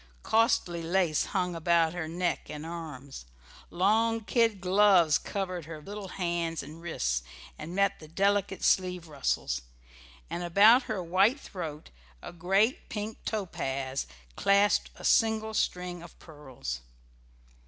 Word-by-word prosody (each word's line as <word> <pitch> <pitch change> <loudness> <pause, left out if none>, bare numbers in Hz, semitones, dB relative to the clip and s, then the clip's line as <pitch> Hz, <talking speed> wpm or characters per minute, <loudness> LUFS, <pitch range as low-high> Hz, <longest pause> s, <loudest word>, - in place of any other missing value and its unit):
Costly 220 -7 +2
lace 170 -2 +1
clung 180 -2 -1
about 165 -1 +2
her 175 -3 -4
neck 175 +2 -2
and 150 +1 -6
arms, 150 - -8 0.4
long 225 +5 +2
kid 225 -2 +1
gloves 185 -4 +4
covered 185 -4 -4
her 160 -1 -8
little 200 +5 -8
hands 170 -3 -2
and 155 +3 -11
wrists 60 - -1 0.3
and 170 - -8
met 200 0 +2
the 155 - -12
delicate 195 +3 0
sleeve 180 -2 +1
ruffles, 135 - -1 0.7
and 175 - -4
about 210 +9 +6
her 205 -4 -2
white 195 - +3
throat 160 - -7 0.3
a - - -8
great 195 +8 +1
pink 215 +1 -5
topaz 135 -10 -3 0.3
clasped 200 - +3
a - - -13
single 220 -1 +2
string 180 -4 -2
of 170 -1 -13
pearls. 130 - -7
175 Hz, 130 wpm, -29 LUFS, 160-200 Hz, 0.7 s, about